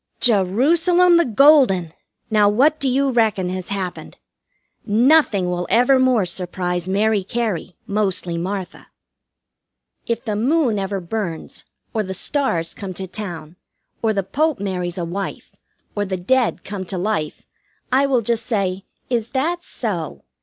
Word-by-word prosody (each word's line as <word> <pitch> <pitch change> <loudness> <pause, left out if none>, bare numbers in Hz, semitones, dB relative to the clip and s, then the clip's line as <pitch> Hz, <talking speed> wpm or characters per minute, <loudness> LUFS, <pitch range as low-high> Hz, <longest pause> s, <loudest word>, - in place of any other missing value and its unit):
Jerusalem 315 - +4
the 340 - +3
Golden! 240 - +4 0.4
Now, 210 -2 +4
what 285 +9 +3
do 270 - 0
you 270 +1 +1
reckon 215 -6 +1
has 185 0 -5
happened! 190 -3 -5 0.7
Nothing 225 - +3
will 180 0 -2
evermore 250 -1 +4
surprise 180 0 -3
Mary 205 +1 +1
Cary, 200 -5 -3
mostly 195 -4 -1
Martha. 185 +2 -5 1.2
If 235 +1 -2
the 215 -2 -1
moon 245 -1 +1
ever 195 0 -2
burns, 175 -3 -5 0.3
or 220 - 0
the 190 -2 -4
stars 185 - 0
come 190 -3 -7
to 190 - -4
town, 175 -4 -7 0.4
or 225 - +2
the 200 -2 -1
Pope 305 - 0
marries 180 -3 -3
a 175 - -2
wife, 195 +4 -6 0.4
or 205 - 0
the 190 -2 -3
dead 245 +7 +1
come 195 -1 -5
to 185 +1 -4
life, 180 -5 -2 0.5
I 270 +2 +3
will 255 -4 +1
just 230 +1 -1
say, 195 -4 -1 0.2
"Is 235 -2 -1
that 345 +6 -1
so?" 180 - -4
205 Hz, 140 wpm, -20 LUFS, 185-250 Hz, 1.2 s, Jerusalem